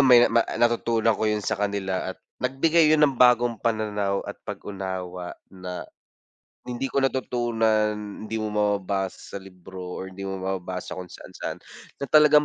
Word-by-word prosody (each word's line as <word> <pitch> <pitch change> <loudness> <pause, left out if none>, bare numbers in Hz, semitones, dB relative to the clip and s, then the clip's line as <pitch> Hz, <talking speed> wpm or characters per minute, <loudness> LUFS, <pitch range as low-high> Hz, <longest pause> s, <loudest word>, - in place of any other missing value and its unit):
may 120 -2 +8
ma 115 0 +4
ah, - - -5
natutunan 115 -1 +3
ko - - -1
yun 105 0 +1
sa 110 0 0
kanila 95 -2 -1
at - - -26 0.3
nagbigay 155 +6 +4
yun 155 - +4
ng 140 -3 +1
bagong 120 -2 +5
pananaw 105 -3 0
at - - -6
pag-unawa 95 -2 -5 0.2
na, 90 -1 -6 0.9
hindi 125 +2 -3
ko 140 - +3
natutunan, 115 -5 +1 0.3
hindi 110 - -2
mo 110 -1 -2
mababasa 100 -2 0 0.2
sa - - -2
libro 95 0 -11 0.2
or 95 0 -6
hindi 100 - -8
mo 95 - -3
mababasa 95 -1 -4
kung 90 -1 -7
saan-saan - - -7 0.4
na 140 - -4
talagang 150 0 +7
105 Hz, 160 wpm, -25 LUFS, 95-120 Hz, 0.9 s, may